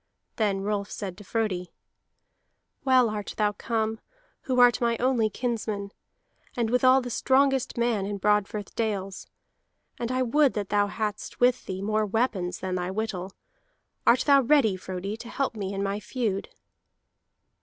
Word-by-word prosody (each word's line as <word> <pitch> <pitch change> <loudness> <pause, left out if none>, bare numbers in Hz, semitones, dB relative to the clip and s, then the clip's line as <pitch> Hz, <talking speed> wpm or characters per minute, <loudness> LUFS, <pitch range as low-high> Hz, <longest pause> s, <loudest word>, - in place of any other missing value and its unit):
Then 200 -3 +1
Rolf 205 0 -2
said 195 -4 -5
to - - -10
Frodi: 195 -4 -2 1.1
"Well 255 -2 +5
art 210 -2 -4
thou 210 -1 +2
come, 220 +1 -2 0.5
who 255 -1 +1
art 245 0 +6
my 235 -1 +2
only 240 -3 +2
kinsman, 215 -4 -3 0.7
and 230 -2 0
withal 255 +1 +5
the 245 -1 -6
strongest 270 +1 +2
man 235 -5 +1
in 205 0 -3
Broadfirth 210 0 0
dales. 200 -4 -3 0.7
And 235 0 -2
I 255 0 +1
would 280 +3 +3
that 205 -2 -3
thou 205 0 +2
hadst 210 0 -4
with 245 0 +2
thee 190 0 -4
more 215 +1 +1
weapons 205 -5 -1
than 185 -1 -3
thy 180 0 -2
whittle. 190 -2 -3 0.7
Art 245 - +6
thou 280 -1 +5
ready, 250 -6 +3
Frodi, 185 +2 -5
to 235 +1 -9
help 275 -3 -2
me 195 -2 -3
in 200 0 -2
my 200 +1 -1
feud?" 210 -3 -2
215 Hz, 155 wpm, -27 LUFS, 200-245 Hz, 1.1 s, art